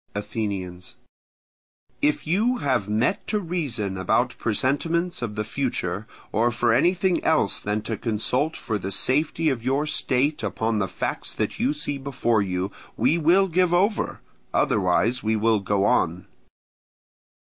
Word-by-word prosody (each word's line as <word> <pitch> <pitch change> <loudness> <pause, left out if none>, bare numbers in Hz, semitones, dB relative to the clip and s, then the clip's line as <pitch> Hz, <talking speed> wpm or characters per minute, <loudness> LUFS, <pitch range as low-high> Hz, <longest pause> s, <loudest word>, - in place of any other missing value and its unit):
Athenians. 100 -4 -4 1.1
If 150 0 +1
you 215 +10 +2
have 130 - 0
met 120 - 0
to 210 - 0
reason 130 - -3
about 120 +7 +1
presentiments 165 - 0
of 110 -3 -3
the 105 - -1
future, 110 -5 -2 0.2
or 115 +3 +2
for 120 0 +2
anything 180 +6 +2
else 155 -11 +2
than 105 +1 -2
to 110 - -3
consult 125 +8 -1
for 110 -2 -3
the 95 +1 -4
safety 150 - +1
of 130 -5 -1
your 135 +4 +1
state 145 0 0
upon 110 +1 -1
the 95 - 0
facts 90 - -4
that - - -2
you 140 +4 +1
see 145 -1 -2
before 125 -5 0
you, 95 0 -2 0.3
we 170 - +2
will 180 +5 +4
give 180 0 +2
over; 200 +4 +1 0.3
otherwise 110 +6 +2
we 110 +1 +1
will 110 0 +2
go 100 0 +1
on. 90 -7 +1
120 Hz, 145 wpm, -24 LUFS, 105-155 Hz, 1.1 s, will